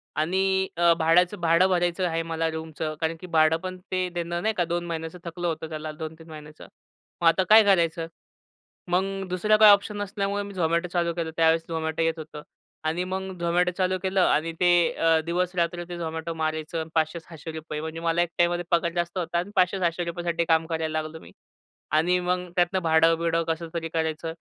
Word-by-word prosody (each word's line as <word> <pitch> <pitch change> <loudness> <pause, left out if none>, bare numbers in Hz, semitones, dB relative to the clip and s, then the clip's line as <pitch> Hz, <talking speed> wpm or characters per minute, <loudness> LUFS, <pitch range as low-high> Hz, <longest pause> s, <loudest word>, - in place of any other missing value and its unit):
आणि 190 +4 +1
अ, 170 -1 +5
भाड्याचं 175 +4 +3
भाडं 170 +2 +4
भरायचं 175 0 +1
आहे 165 0 -1
मला 165 0 -2
रूमचं 160 -1 -5
कारण 165 0 0
की 180 - -9
भाडं 160 -1 +3
पण 185 0 -6
ते 185 0 0
देणं 170 0 -3
नाही 220 0 +1
का 175 - +2
2 175 +1 -2
महिन्याचं 165 +1 -5
थकलं 175 +1 -4
होतं 160 0 -3
त्याला 155 0 -5
2-3 160 +1 -9
महिन्याचं. 150 0 -11 0.6
मग 170 - +4
आता 185 +3 +4
काय 220 0 +9
करायचं. 170 -4 +2 0.8
मग 185 +2 +3 0.3
दुसरा 210 +4 +2
काही 215 -1 +9
ऑप्शन 205 +1 +2
नसल्यामुळे 200 0 -2
मी 200 0 -9
झोमॅटो 170 0 0
चालू 170 -1 +1
केलं. 165 -1 -3
त्यावेळेस 165 0 +3
झोमॅटो 160 -1 -2
येत 165 0 +2
होतं 155 -1 -8 0.4
आणि 160 +3 -1
मग 190 0 -5
झोमॅटो 175 +1 +1
चालू 185 0 +1
केलं 190 0 +1
आणि 165 -1 +2
ते 175 -1 +4 0.2
अ, 165 -1 +3
दिवस-रात्री 175 0 -1
ते 175 - -5
झोमॅटो 160 0 -4
मारायचं 155 0 -3
आणि 160 - -5
₹500-600 160 -1 -3
म्हणजे 160 +1 -5
मला 165 0 +1
एक 175 - 0
टाईममध्ये 175 0 +1
पगार 170 0 +2
जास्त 175 +1 -2
होता 170 -1 -2
आणि 185 +4 -5
₹500-600 175 -2 0
साठी 170 0 -1
काम 160 0 +3
करायला 160 -1 -2
लागलो 155 +1 -8
मी. - - -15 0.6
आणि 175 +4 +3
मग 180 0 -2
त्यातनं 180 +1 +2
भाडं-बिडं 165 +1 +3
कसं 165 +1 -2
तरी 165 -1 -3
करायचं. 160 0 -2
170 Hz, 185 wpm, -25 LUFS, 160-180 Hz, 0.8 s, काय